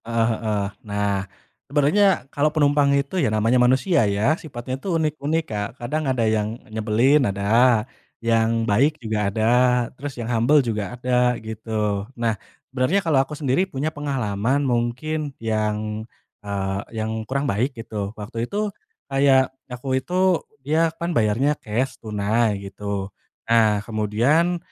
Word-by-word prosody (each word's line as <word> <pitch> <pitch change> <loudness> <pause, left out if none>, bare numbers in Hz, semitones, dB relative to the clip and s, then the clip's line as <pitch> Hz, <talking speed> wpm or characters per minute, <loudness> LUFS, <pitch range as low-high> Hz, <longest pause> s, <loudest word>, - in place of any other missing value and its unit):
Heeh 115 0 +1
heeh. 110 -2 -1 0.3
Nah, 100 -1 -1 0.4
sebenernya 150 +4 +3
kalau 145 +2 +2
penumpang 145 -2 +3
itu 140 +6 -1
ya - - +2
namanya 110 +4 +2
manusia 130 +7 +3
ya, 105 +9 +2
sifatnya 135 -6 -6
itu 195 - -5
unik-unik 155 0 0
Kak, 105 -5 -3
kadang 150 +6 -2
ada 125 -3 +1
yang 110 +1 0 0.2
nyebelin 115 +7 +3
ada, 110 +3 +3 0.3
yang 115 0 +1
baik 135 +9 +2
juga 110 -5 -1
ada, 110 +2 -1 0.5
terus 140 +1 -7
yang 120 - -4
humble 120 +6 +4
juga 110 +1 -3
ada, 125 0 +2
gitu. 105 -2 -2
Nah, 115 -1 +1 0.4
benarnya 145 +10 +1
kalau 150 -5 +4
aku 145 +2 -5
sendiri 150 +7 +1
punya 150 +2 -3
pengalaman 135 -2 -1
mungkin 135 +5 -1
yang, 110 0 -2 0.3
eee, 100 -1 -2 0.2
yang 110 0 -2
kurang 140 +2 0
baik 125 +4 -1
gitu. 105 -3 -4
Waktu 115 +3 -5
itu 210 0 -2 0.3
kayak 135 -1 +3 0.2
aku 130 +1 -2
itu, 185 +2 +1 0.2
ya 160 +3 +2
kan 170 +1 -2
bayarnya 115 +4 +2
cash, 125 +3 -2
tunai 105 0 0
gitu, 100 0 -4 0.4
nah 110 -3 +3
kemudian, 120 - +1
120 Hz, 140 wpm, -23 LUFS, 110-145 Hz, 0.5 s, humble